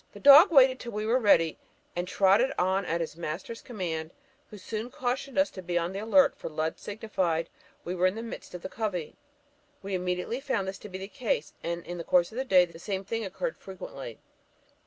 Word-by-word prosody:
The - - -11
dog 290 +7 +9
waited 260 -3 +6
till 235 - -7
we 210 +1 -2
were 240 +4 +3
ready, 165 -8 +3 0.4
and 175 +1 -2
trotted 200 +8 +4
on 190 +1 +1
at 170 +1 0
his 160 - -4
master's 170 +7 -5
command, 165 -8 -4 0.4
who 210 - -10
soon 220 +4 -5
cautioned 260 +2 -3
us 285 +1 +3
to 185 - -8
be 175 -1 -2
on 170 +2 -1
the 195 - -4
alert, 225 +7 +4
for - - -7
Lud 155 +1 -2
signified 185 -6 -2 0.4
we 175 - -3
were 185 0 +3
in 185 - -1
the 225 - -5
midst 230 -5 -8
of 175 - -8
the - - -3
covey. 190 -6 -4 0.7
We 195 0 -5
immediately 180 +6 -2
found 260 -9 -1
this 195 +1 -5
to 210 - -10
be 190 - -6
the 190 +1 -6
case, 215 - -2
and 170 0 -3
in 175 0 -6
the - - -4
course 175 0 +3
of 230 - -5
the 265 - -1
day 185 -7 +6
the 170 -1 -14
same 195 +1 -4
thing 225 +3 -3
occurred 475 - -4
frequently." 140 - -8
190 Hz, 220 wpm, -28 LUFS, 175-230 Hz, 0.7 s, dog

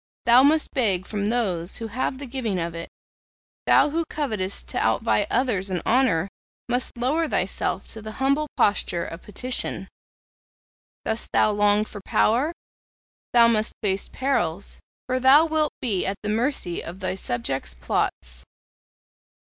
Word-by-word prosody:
Thou 235 +2 +7
must 305 +3 +3
beg 195 -8 +1
from 205 -1 -2
those 195 -7 0
who 230 - -5
have 255 +3 -2
the 280 - -7
giving 240 -6 -3
of 170 -1 -3
it; 165 0 -7 0.8
thou 295 - +5
who 335 +2 0
covetest 215 -12 -2
to - - -1
outvie - - +1
others 210 -7 0
in 185 -2 -1
honour 230 -9 +2 0.4
must 245 +1 0
lower 295 +7 +1
thyself - - -1
to 220 - -5
the 215 0 -7
humble 275 +4 +1
posture 175 -4 +1
of 165 +2 -8
petition. 245 +5 -3 1.2
Dost 220 +1 -2
thou 215 - +4
long 205 0 +3
for 205 -1 -9
power? 250 - +2 0.8
Thou 235 -1 +7
must 220 -1 +1
face 195 -1 0
perils, 200 -10 -2 0.3
for 255 0 -1
thou 270 +5 +7
wilt 310 -2 0
be 210 -7 +1
at 195 +1 -2
the 210 - -2
mercy 225 -5 -1
of 175 +3 -8
thy 185 -1 -2
subjects' 120 - -3
plots. - - -2
220 Hz, 145 wpm, -24 LUFS, 185-260 Hz, 1.2 s, Thou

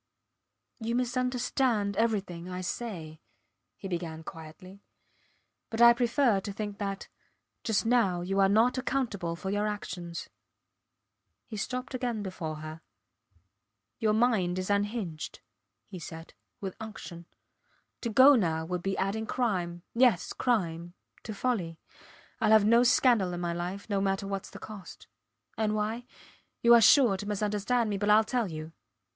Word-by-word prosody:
You 230 +1 -2
misunderstand 250 -3 0
everything 195 -6 -1
I 180 0 -4
say, 175 -6 -5 0.6
he 195 - -7
began 170 -3 -4
quietly, 185 +4 -11 0.9
but 225 - -4
I 235 0 +9
prefer 240 -2 +2
to 200 +1 -5
think 205 0 -5
that 195 -1 -4 0.6
just 220 -1 +1
now 225 -7 +2
you 195 +3 -1
are 195 0 +5
not 230 +5 +3
accountable 225 -11 -2
for 190 +3 -4
your 205 +1 0
actions. 175 -5 -5 1.2
He 220 - -8
stopped 250 +5 -4
again 245 -4 -2
before 170 -5 -5
her. 155 +1 -8 1.2
Your 220 -3 +2
mind 215 -6 +2
is 185 +2 -2
unhinged, 200 -6 -2 0.4
he 185 -3 -9
said, 165 0 -9 0.3
with 190 -2 -5
unction. 175 -6 -9 0.7
To 235 - -2
go 260 +6 +8
now 165 - +1
would 180 +1 -3
be 195 +1 -2
adding 215 +3 -1
crime 180 -9 -1
yes, 235 -6 +3
crime 175 -8 -1 0.3
to 220 - -7
folly. 200 -7 -2 0.6
Ill - - +3
have 215 -1 +6
no 230 +2 +6
scandal 240 -7 +4
in 175 - -4
my 175 -1 -2
life, 180 +4 -5
no 200 -2 0
matter 195 0 0
whats 195 0 -4
the - - -10
cost. 210 -4 -10 0.5
And 215 -1 +1
why? 220 +3 -2 0.6
You 235 0 +7
are 235 - +8
sure 225 -3 +6
to 205 - -6
misunderstand 210 +3 0
me 200 -2 -2
but 205 0 0
Ill 215 +1 +6
tell 235 -2 -1
you. 155 0 -7
205 Hz, 145 wpm, -29 LUFS, 180-235 Hz, 1.2 s, I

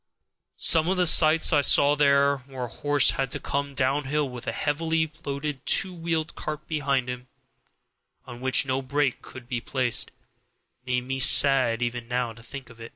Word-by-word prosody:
Some 165 0 +4
of 190 - 0
the 180 - +2
sights 160 -1 +5
I 145 - +4
saw 145 +1 +4
there, 140 -1 +2
where 130 -2 -7
a - - -4
horse 145 +3 +2
had 135 -1 -3
to - - -4
come 140 0 -4
downhill 140 +2 -1
with 125 -2 -10
a - - -1
heavily 160 +1 -2
loaded 140 -1 -5
two 190 -2 +2
wheel 165 -2 -2
cart 155 -2 -8
behind 140 -5 -2
him, 125 0 -7 1.0
on 120 -1 -11
which 130 +1 +2
no 130 0 -2
brake 135 0 -2
could 130 -2 -13
be 120 -2 -4
placed, 125 -2 -2 0.8
make 125 0 -1
me 135 +1 -5
sad 130 -4 +3
even 120 0 -5
now 125 -1 -3
to 115 - -16
think 125 +1 -11
of. 115 0 -17
140 Hz, 175 wpm, -24 LUFS, 125-150 Hz, 1.0 s, sights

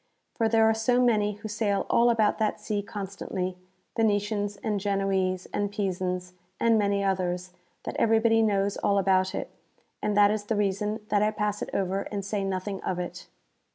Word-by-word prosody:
For 225 -1 +1
there 225 0 +4
are 220 - +4
so 225 +3 +2
many 215 -4 +3
who 215 +2 -8
sail 210 -2 0
all 235 +1 +4
about 220 -2 +2
that 215 -1 0
sea 205 -1 -2
constantly, 195 -3 -5 0.4
X'enetians, 205 -2 0
and 210 -3 0
(ienoese, 195 -2 0
and 205 -1 -1
Pisans, 185 -3 -2 0.3
and 230 -1 +4
many 200 -1 +1
others, 180 -2 -1 0.3
that - - -5
everybody 225 0 +4
knows 200 -2 +1
all 200 - +1
about 190 -1 +2
it, - - -4 0.5
and 210 -1 0
that 205 0 +6
is 210 -1 -2
the 220 - -1
reason 210 +2 -1
that 205 - +2
I 210 - +3
pass 210 -1 -2
it - - -3
over 195 0 0
and 200 -2 -3
say 200 0 -2
nothing 195 +1 -3
of 185 - -2
it. 180 +1 -6
205 Hz, 180 wpm, -27 LUFS, 195-215 Hz, 0.5 s, that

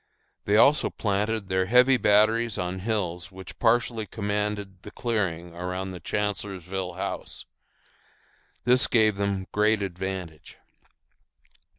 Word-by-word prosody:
They 105 +1 +3
also 140 +6 +5
planted 105 0 -1
their 95 0 0
heavy 125 +4 +6
batteries 110 +1 +3
on 90 +1 -3
hills 95 -3 -2
which 95 0 -11
partially 115 -2 +1
commanded 105 -1 -3
the - - -10
clearing 90 -8 -2
around 90 +2 -4
the 90 - -7
Chancellorsville 95 -3 -3
House. 95 - -5 1.2
This 125 +1 +4
gave 110 -4 +3
them 100 -1 -1
great 105 0 +2
advantage. 90 -4 -6
100 Hz, 110 wpm, -26 LUFS, 95-110 Hz, 1.2 s, heavy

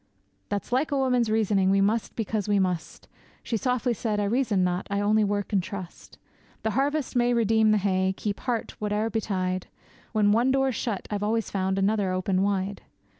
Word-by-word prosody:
'That's 205 +3 -3
like 265 +5 +1
a 285 - +1
woman's 250 -4 +2
reasoning, 205 -3 +2
we 195 +1 +3
must 210 +3 0
because 215 -2 -2
we 205 - +3
must!' 180 -4 -2 0.4
She 230 - -2
softly 250 +1 0
said, 215 -2 -2
'I - - +1
reason 210 -3 +1
not, 180 0 -1
I 200 0 0
only 210 +1 +3
work 205 +1 -2
and 195 - +3
trust; 180 -1 -9 0.5
The 220 - 0
harvest 280 +5 0
may 240 0 +3
redeem 220 -1 +3
the 215 - +4
hay, 190 -1 +1
keep 205 -1 -3
heart 240 -3 -2
whate'er 210 +1 -1
betide; 185 -4 -2 0.4
When 210 -2 +3
one 235 +5 +3
door's 270 0 +2
shut 215 -2 -3
I've 205 -1 -2
always 220 +1 -1
found 190 -1 0
another 195 -1 +1
open 185 0 0
wide. 195 0 -1
210 Hz, 185 wpm, -26 LUFS, 195-230 Hz, 0.5 s, the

